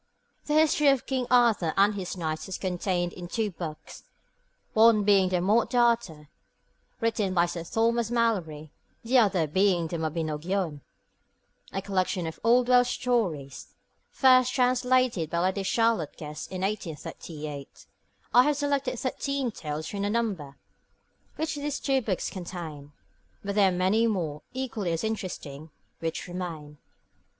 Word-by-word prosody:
The 300 - +1
history 310 -1 +4
of 275 -3 +3
King 260 -2 -2
Arthur 230 -9 +3
and 200 +2 +5
his 190 -2 -5
Knights 160 0 -3
is 190 - -3
contained 180 -1 -1
in 175 -1 -8
two 215 +2 -1
books, 165 -3 -8 0.7
one 220 -1 +5
being 195 -2 +4
the 180 -1 0
Morte 215 +7 +2
D'Arthur, 230 -11 +1 0.7
written 220 -5 0
by 170 0 +4
Sir 170 -1 -5
Thomas 230 +4 +1
Malory, 180 -11 -1 0.3
the 250 +3 +4
other 195 -7 +3
being 180 +2 +2
the 170 - -4
Mabinogion, 160 +1 -2 0.9
a 195 - -3
collection 185 -2 -1
of 160 0 -6
old 240 +2 +4
Welsh 250 -1 +4
stories, 185 - -2 0.3
first 255 - +5
translated 250 - +2
by 170 - -2
Lady 185 +3 +1
Charlotte 225 -5 +1
Guest 150 0 -7
in 185 -1 -4
1838. 155 -6 -6 0.5
I 245 - +8
have 295 0 +1
selected 280 -3 -1
thirteen 270 0 -2
tales 155 -5 -5
from 200 +3 -4
the 200 - 0
number 200 -11 -2 0.8
which 315 0 -2
these 290 0 -3
two 270 -2 +1
books 200 -6 -2
contain; 165 -6 -7 0.5
but 200 0 -3
there 200 -2 +4
are - - -1
many 190 +6 +2
more, 165 -9 -2
equally 230 -9 -3
as 165 - -2
interesting, 165 -9 -5 0.3
which 165 +1 -4
remain. 165 -5 -6
195 Hz, 140 wpm, -27 LUFS, 165-235 Hz, 0.9 s, I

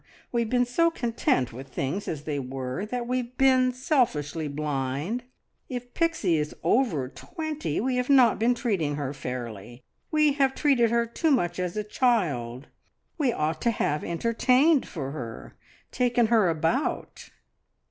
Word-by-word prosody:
We 235 - +1
have 230 - -2
been 245 0 +2
so 335 +8 +2
content 230 - 0
with 130 +3 -8
things 140 +9 -3
as 150 -3 -4
they 150 -2 -2
were 130 +7 -4
that 245 +1 -3
we've 250 0 -3
been 260 -1 +4
selfishly 225 - 0
blind. 145 - -3 0.4
If 245 -1 -6
Pixie 320 - +1
is 150 0 -3
over 175 - +2
twenty 310 - -4
we 255 +3 0
have 250 +1 -1
not 255 -6 +5
been 240 +2 +3
treating 190 - -1
her 140 -1 -3
fairly. 120 -3 -7 0.3
We 305 -2 +3
have 270 -2 +1
treated 265 -6 +3
her 235 0 +2
too 275 +8 -1
much 175 - +1
as 180 +1 -2
a 210 - 0
child. 155 - 0 0.5
We 275 -5 +2
ought 155 -4 -2
to 235 - +2
have 150 -9 -1
entertained 250 - +2
for 140 -5 -5
her, 120 -6 -7 0.4
taken 245 -1 +2
her 215 -6 +5
about." 165 0 -1
220 Hz, 155 wpm, -26 LUFS, -, 0.5 s, not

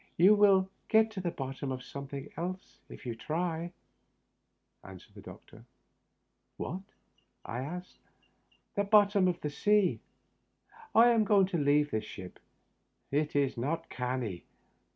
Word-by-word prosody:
" - - -42
You 210 +2 +8
wiU 195 -2 +5 0.2
get 220 0 +4
to 200 -3 -5
the 180 - -1
bottom 135 -2 -5
of 130 -1 -5
something 140 +1 -7
else 180 +3 -6
if - - -11
you 120 - -3
try," 165 +5 -3 1.1
answered 95 -1 -13
the - - -12
doctor. - - -13 0.9
"What?" 185 +4 -4 0.6
I 120 - -4
asked. 175 +7 -7 0.4
" - - -39
The 200 - +2
bottom 205 -2 +4
of 175 -1 0
the 150 - -3
sea. 205 +4 +2 1.0
I 235 +2 +8
am 230 -2 +4
going 200 -2 +4
to 175 -4 -1
leave 145 +1 +3
this 110 0 -1
ship. 95 -2 -10 0.7
It 150 +1 0
is 140 -3 +1
not 145 +8 -3
canny." 125 -7 -3
165 Hz, 145 wpm, -31 LUFS, 135-195 Hz, 1.1 s, You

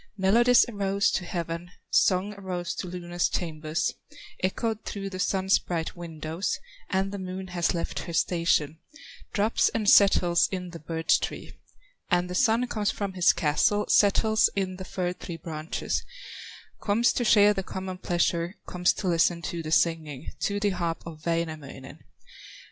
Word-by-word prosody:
Melodies 235 +6 +5
arose 200 -3 0
to 180 - -2
heaven, 170 0 -4 0.2
Songs 190 +2 +3
arose 180 -3 -4
to 185 - -5
Luna's 175 0 -2
chambers, 155 -2 -2 0.5
Echoed 220 +3 -1
through 195 -1 -5
the 185 - -6
Sun's 190 +1 +2
bright 165 -2 -4
windows 165 +1 -4 0.3
And 195 0 0
the 200 - -5
Moon 185 0 -6
has 175 -1 0
left 170 - -3
her 170 - -6
station, 165 -3 +1 0.5
Drops 215 +1 +2
and 220 -2 -2
settles 180 -4 +5
in 180 -2 -4
the 170 - -8
birch 160 +1 +1
tree; - - -6 0.6
And 175 0 +1
the - - -3
Sun 230 +4 +3
comes 215 -4 -1
from 200 -2 -3
his 180 -2 +5
castle, 165 +7 +1
Settles 220 +1 +4
in 185 -2 -2
the 185 - -7
fir 180 -1 -2
tree 170 -2 -8
branches, 160 -1 -4 0.8
Comes 225 +3 +2
to 245 - 0
share 210 -2 +6
the 195 - -2
common 185 0 -6
pleasure, 175 0 0
Comes 180 0 +1
to 195 - -4
listen 170 0 +2
to 170 -1 -3
the 155 -1 -6
singing, 160 -4 0
To 205 0 -1
the 205 0 +1
harp 170 -3 -3
of 160 -2 -9
Wainamoinen. 155 -5 -4
180 Hz, 155 wpm, -27 LUFS, 170-200 Hz, 0.8 s, share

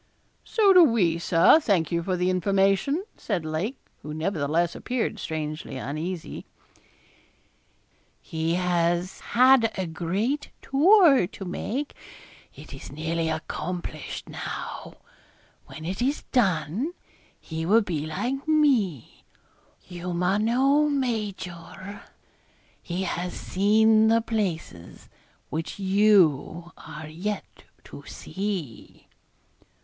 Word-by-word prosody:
'So 410 -4 +4
do 365 -2 +9
we, 190 - +2
Sir; 170 - +5
thank 190 - +1
you 170 0 +1
for 185 +1 -1
the 180 +1 +1
information,' 195 - +1
said 185 -7 -3
Lake, 165 - -3 0.2
who 150 +1 -7
nevertheless 165 0 0
appeared 245 -4 -2
strangely 155 -4 -5
uneasy. 155 +7 -5 1.8
'He 160 +1 -2
has 175 0 0
had 250 -2 +4
a 190 - -1
great 190 - -2
tour 295 - +5
to 195 - -9
make. 255 +10 -4 0.6
It - - -12
is - - -10
nearly 160 +2 -2
accomplished 160 0 -5
now; - - -6 0.7
when 160 0 -9
it 190 +6 -4
is 275 +4 0
done, 195 - +1 0.5
he 160 0 -5
will 210 +7 +4
be 155 -6 -3
like 255 - -3
me, 260 - +1 0.6
humano 210 +12 +1
major. 205 - -4 0.8
He 180 +2 -3
has 180 0 -3
seen 215 +3 +3
the 230 +1 +4
places 180 - -4 0.4
which 160 +1 -4
you 190 -5 +3
are 155 -1 -9
yet 190 +7 -6 0.2
to - - -11
see.' 190 - -6
185 Hz, 105 wpm, -25 LUFS, 165-225 Hz, 1.8 s, do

